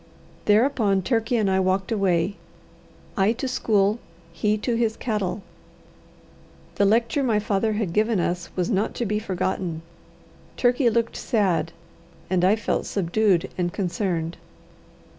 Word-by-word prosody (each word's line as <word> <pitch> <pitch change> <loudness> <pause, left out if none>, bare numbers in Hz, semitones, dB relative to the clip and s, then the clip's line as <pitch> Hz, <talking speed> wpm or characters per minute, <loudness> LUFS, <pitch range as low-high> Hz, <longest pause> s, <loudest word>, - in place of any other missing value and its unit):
Thereupon 210 -3 +3
Turkey 230 +2 +1
and 215 -3 +1
I 190 0 +2
walked 190 +1 0
away, 195 -3 +1 0.8
I 200 +2 +3
to 255 +3 -4
school, 210 -3 +1 0.3
he 210 +5 +1
to 235 +3 -2
his 230 -1 0
cattle. 210 -4 -2 1.3
The 200 - +4
lecture 230 +6 +2
my 235 -5 +2
father 210 +1 0
had 210 -5 -2
given 215 0 +2
us 175 0 -2
was 185 +5 -1
not 200 +1 0
to 240 - -2
be 210 0 0
forgotten. 185 -4 -3 0.7
Turkey 245 0 +3
looked 230 0 0
sad, 180 - 0 0.6
and 180 -1 +2
I 190 +3 +5
felt 220 - -2
subdued 190 -1 +1
and 175 -1 0
concerned. 175 -3 -2
205 Hz, 135 wpm, -24 LUFS, 185-225 Hz, 1.3 s, I